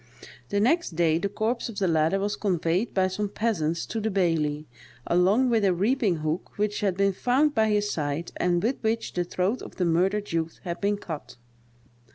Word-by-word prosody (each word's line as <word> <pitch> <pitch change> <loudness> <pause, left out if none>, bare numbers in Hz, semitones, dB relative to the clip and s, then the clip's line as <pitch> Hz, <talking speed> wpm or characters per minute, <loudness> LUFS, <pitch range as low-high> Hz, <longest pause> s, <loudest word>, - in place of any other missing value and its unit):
The 205 - 0
next 255 - +1
day, 165 -1 +2
the 200 - -1
corpse 225 +4 -2
of 220 - -9
the 190 - +1
latter 160 +3 +2
was 205 +1 -1
conveyed 180 +1 0
by 190 -1 +2
some 200 +2 -3
peasants 170 -8 -1
to 225 - -4
the 220 - 0
baillie, 160 -6 0 0.4
along 200 +9 +3
with 225 -2 +2
a 190 -3 +3
reaping 210 0 +1
hook 155 +4 -3
which 210 0 0
had 195 -3 0
been 195 0 +2
found 265 +9 +2
by 220 -3 +2
his 205 0 +1
side, 150 +2 -3
and 175 -1 +1
with 245 +5 +1
which 225 0 -1
the 175 - 0
throat 185 +7 -1
of - - -10
the 180 - 0
murdered 190 +5 +1
youth 165 -1 -2
had 170 -2 -5
been 205 0 +1
cut. 160 -6 -7
195 Hz, 200 wpm, -26 LUFS, 170-215 Hz, 0.4 s, along